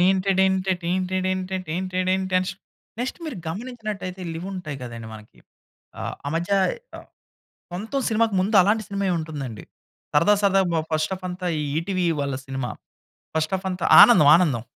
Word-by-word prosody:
టెయింటడెంట 190 0 +3 0.2
టెయింటడెంట 185 +1 -1 0.2
టెయింటడెంట 185 +2 -1
అన్ 185 - -3 0.5
next 250 +2 -3
మీరు 310 -7 -5
గమనించినట్లైతే 210 -1 -5
ఇవి 170 +3 -6
ఉంటాయి 155 -7 -5
గదండీ 115 -2 -7
మనకి. 105 0 -14 0.6
ఆహ్, - - -4
ఆ - - 0
మధ్య 170 +3 -2 0.5
ఆహ్, - - -12 0.6
సొంతం 220 +10 -3
సినిమాకి 225 -2 +1
ముందు 205 +3 +2
అలాంటి 215 +3 +2
సినిమాయె 200 -2 -1
ఉంటుందండి. 140 - -6 0.5
సరదా 170 +8 +5
సరదాగా 195 -2 +3
బా 160 - +2
ఫస్ట్ 155 +3 0
హాఫ్ 185 0 -6
అంతా 180 0 -5
ఈ - - -1 0.2
ఈటీవీ 180 +1 -1
వాళ్ళ 140 -1 -2
సినిమా. 135 -2 -4 0.7
ఫస్ట్ 155 +1 0
హాఫ్ 190 0 -3
అంతా 180 -1 -2 0.2
ఆనందం 155 -12 +7
ఆనందం. 140 -11 0
185 Hz, 145 wpm, -23 LUFS, 160-195 Hz, 0.7 s, ఆనందం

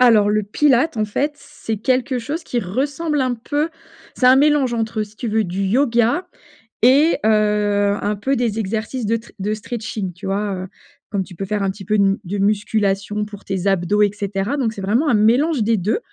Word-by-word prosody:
alors, 220 -4 +5
le 215 0 +1
Pilates, 265 +5 +2
en 215 - +1
fait, 280 +8 -1
c'est 225 -5 -6
quelque 255 +3 0
chose 300 +8 -4
qui 240 - -1
ressemble 285 - -1
un 255 -2 +1
peu 290 +7 -2 0.5
c'est 250 - +2
un 255 +1 +7
mélange 285 -3 +3
entre, 225 -1 -1
si 210 0 -10
tu 245 - -5
veux 220 0 +1
du 185 +1 -3
yoga 240 - +2 0.5
et 280 +7 +5
heu, 210 -1 +2
un 210 - -1
peu 265 +7 -1
des 225 -2 -1
exercices 220 +3 -3
de 230 +2 +2
tre 230 +1 -11
de 210 +2 -1
stretching, 215 -3 -5
tu 185 - -10
vois? 200 +1 -1
Heu, 185 0 -5 0.4
comme 195 -2 -1
tu 180 - -13
peux 195 - -5
faire 205 0 -1
un 195 - +1
petit 195 -1 -11
peu 210 - -1
une 200 -1 +3
de 200 +2 -4
musculation 205 0 0
pour 205 -1 -11
tes 195 0 -3
abdos 195 +2 +2
et 205 - +4
cetera. 205 +5 -2
Donc, 235 -5 0
c'est 200 - -8
vraiment 230 +11 +1
un 245 - +3
mélange 240 +5 +3
des 225 +1 +2
2 205 - 0
215 Hz, 210 wpm, -20 LUFS, 205-250 Hz, 0.5 s, un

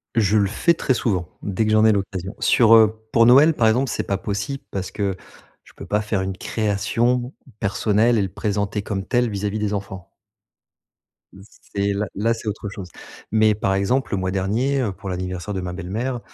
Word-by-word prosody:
Je 110 -1 +3
le 100 -1 +3
fais 170 - +2
très 135 -4 0
souvent, 95 -9 -1 0.2
dès 100 +2 -1
que 110 - 0
j'en 110 0 +5
ai 110 - +6
l'occasion. 100 -1 -3
Sur, 115 -2 +5
heu 110 0 +4
pour 115 0 +5
Noël 140 +6 +7
par 115 -5 +2
exemple, 125 +3 +2
c'est - - -2
pas 100 - 0
possible 105 +8 -4
parce 95 -1 -4
que, 100 -2 -2 0.5
je - - -19
peux - - -10
pas 105 - +1
faire 105 -2 -1
une 95 0 -4
création 115 +4 -1 0.3
personnelle 110 +4 +2
et - - +2
le 95 - -1
présenter 100 0 -2
comme 95 -2 -3
tel 120 0 +1
vis-à-vis 100 +1 -2
des 105 -1 -1
enfants. 95 -3 -6 1.2
Mmh 95 - -14 0.3
c'est 100 0 +1
là 105 +2 -1
là, 115 +4 +1
c'est 115 -1 -8
autre 105 -1 -4
chose. 95 -3 -8 0.4
Mais 110 -1 +4
par 95 -2 0
exemple, 100 +6 0
le - - +1
mois 95 0 -2
dernier, 115 +9 0
heu, 110 - -1
pour 95 +1 -8
l'anniversaire 90 +2 -4
de 95 - -3
ma 90 -1 -5
belle-mère, 110 +8 -3
105 Hz, 200 wpm, -22 LUFS, 95-115 Hz, 1.2 s, Noël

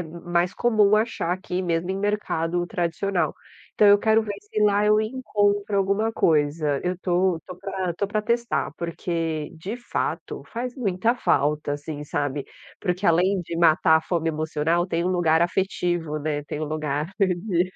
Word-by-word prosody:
m 170 0 -8
mais 175 +1 0
comum 215 -3 +3
achar 215 -5 0
aqui, 185 0 -3
mesmo 170 0 -1
em 190 - -1
mercado 175 -4 -1
tradicional. 175 -1 -1 0.4
Então, 210 - +4
eu 205 0 +7
quero 220 +1 +3
ver 205 -2 -4
se 210 +1 -4
lá 205 0 +3
eu 210 0 +4
encontro 205 -3 0
alguma 200 +3 +1
coisa. 150 -3 +1
Eu 180 0 0
tô 180 -2 +1
tô 180 -1 -8
pra 190 -2 -3
tô 200 +4 -1
pra 215 +1 -1
testar, 235 +2 0
porque, 165 -2 -3
de 195 +9 -6
fato, 240 - -3
faz 245 +2 -4
muita 225 -1 +1
falta, 150 - +1
assim, 145 0 -5
sabe. 145 -1 -2 0.4
Porque 180 +1 -1
além 180 +3 +3
de 170 0 -6
matar 160 -1 +5
a 160 - -1
fome 165 -2 -1
emocional, 160 +2 0
tem 170 -2 -1
um - - +1
lugar 165 -3 +2
afetivo, 175 -3 0
né, 150 0 -2
tem 150 - -5
um - - -1
lugar 155 +1 -2
de 185 -1 +1
180 Hz, 170 wpm, -24 LUFS, 160-205 Hz, 0.4 s, eu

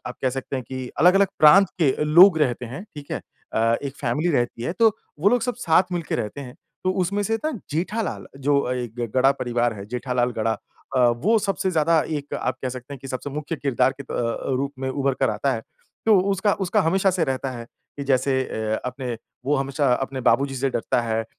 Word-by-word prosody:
आप 125 - -6
कह 130 - +2
सकते 135 +1 -4
हैं 130 - -3
कि 130 -1 -5
अलग-अलग 190 +5 +6
प्रांत 190 +6 +7
के 145 -4 +5
लोग 170 +4 +7
रहते 125 -4 0
हैं, 135 +10 -7
ठीक 145 -1 -10
है? - - -2 0.3
अ, 115 +1 +2
एक 140 -1 -5
फैमिली 145 +7 0
रहती 120 -4 -1
है 165 - -2
तो 225 -1 +7 0.3
वो 200 - +5
लोग 245 0 +2
सब 245 +1 -1
साथ 165 -4 +4
मिल 175 -1 -1
के - - -4
रहते 105 +7 -4
हैं। 125 -2 -9 0.3
तो 185 - +2
उसमें 200 +3 -1
से 225 +3 0
ना 310 - +1 0.2
जेठालाल, 190 +8 -2
जो 140 -2 +1
एक 120 -3 -4 0.2
गढ़ा 135 +1 +5
परिवार 120 -3 -1
है 100 -1 -8
जेठालाल 125 +1 -1
गढ़ा 110 +1 +1 0.4
अ, - - +4
वो 125 - +3
सबसे 195 -2 -1
ज़्यादा 165 0 +3 0.2
एक 145 0 -6
आप 130 0 -2
कह 130 - -1
सकते 130 +2 -7
हैं - - -10
कि 135 - -7
सबसे 130 +2 -4
मुख्य 150 +3 -4
किरदार 135 -2 +1
के - - -3
अ, 120 +2 -1
रूप 140 +2 -2
में 130 0 -3
उभर 140 0 0
कर - - +3
आता - - 0
है। - - -5 0.4
तो 215 -3 +6
उसका 195 +1 +2
उसका - - +2
हमेशा 190 +4 +2
से 180 -2 +1
रहता 135 -1 -2
है 120 -2 -7 0.3
कि 140 - -4
जैसे 130 0 +2
अ, 110 0 -2
अपने 125 -2 -4 0.3
वो 145 +1 +2
हमेशा 135 0 +1
अपने 135 0 -3
बाबू 140 - +2
जी 135 - -7
से 135 +1 0
डरता 120 - 0
है। 115 -1 -1
135 Hz, 220 wpm, -23 LUFS, 125-165 Hz, 0.4 s, प्रांत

